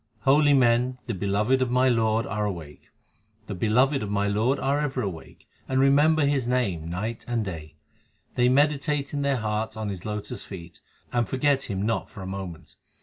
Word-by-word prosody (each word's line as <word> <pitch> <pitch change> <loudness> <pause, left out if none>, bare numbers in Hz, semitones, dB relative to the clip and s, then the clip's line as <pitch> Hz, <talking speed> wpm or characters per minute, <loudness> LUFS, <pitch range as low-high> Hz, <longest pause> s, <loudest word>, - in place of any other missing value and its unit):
1 135 0 +5
Holy 145 -1 +4
men 125 -1 +3
the 120 - -3
beloved 105 +7 +1
of 130 - +1
my 125 +1 +3
Lord 115 -2 +2
are 105 +2 -2
awake; 85 -8 -6 0.6
The 105 - -5
beloved 125 +9 +2
of 105 - -4
my 100 0 0
Lord 110 +7 +1
are 140 +2 0
ever 135 -4 -1
awake, 90 -5 -8 0.2
and 130 0 0
remember 145 +3 +4
His 140 -4 +1
name 100 -11 -1
night 105 +7 -4
and 120 -3 -1
day. 80 -5 -7 0.6
They 125 0 +3
meditate 145 +1 +1
in 145 - -1
their 140 -1 +1
hearts 110 -1 -2
on 110 -1 -3
His 95 -3 -6
lotus 105 -1 -5
feet, 85 -3 -10 0.3
and 120 -1 +1
forget 135 +1 +1
Him 95 -1 -2
not 115 +2 -1
for 100 - -9
a - - -6
moment. 95 -3 -7
115 Hz, 190 wpm, -25 LUFS, 100-135 Hz, 0.6 s, 1